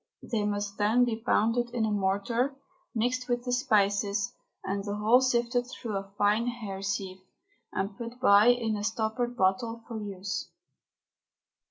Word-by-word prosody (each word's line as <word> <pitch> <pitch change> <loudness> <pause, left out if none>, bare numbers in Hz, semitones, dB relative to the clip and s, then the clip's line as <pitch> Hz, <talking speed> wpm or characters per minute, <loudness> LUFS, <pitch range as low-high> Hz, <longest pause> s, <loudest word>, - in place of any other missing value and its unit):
They 225 -4 -1
must 205 0 -3
then 220 +4 +4
be 235 -2 -1
pounded 240 0 +2
in 225 -2 +1
a 215 - -1
mortar, 200 +5 +1
and 275 -1 -16 0.4
mixed 250 +3 0
with 245 0 0
the 250 - -3
spices, 205 -5 +1 0.3
and 195 +1 -2
the 205 0 -3
whole 220 +5 +4
sifted 245 -1 +1
through 230 -4 -5
a 195 0 -4
fine 210 +3 +2
hair 215 -6 -4
sieve 195 -1 -3 0.5
and 195 +1 -2
put 235 +3 -7
by 205 -3 +6
in 235 -3 +3
a 205 - -4
stoppered 225 +3 -1
bottle 225 +4 +1
for 225 -2 -5
use. 195 -1 -4
220 Hz, 160 wpm, -29 LUFS, 200-245 Hz, 0.5 s, by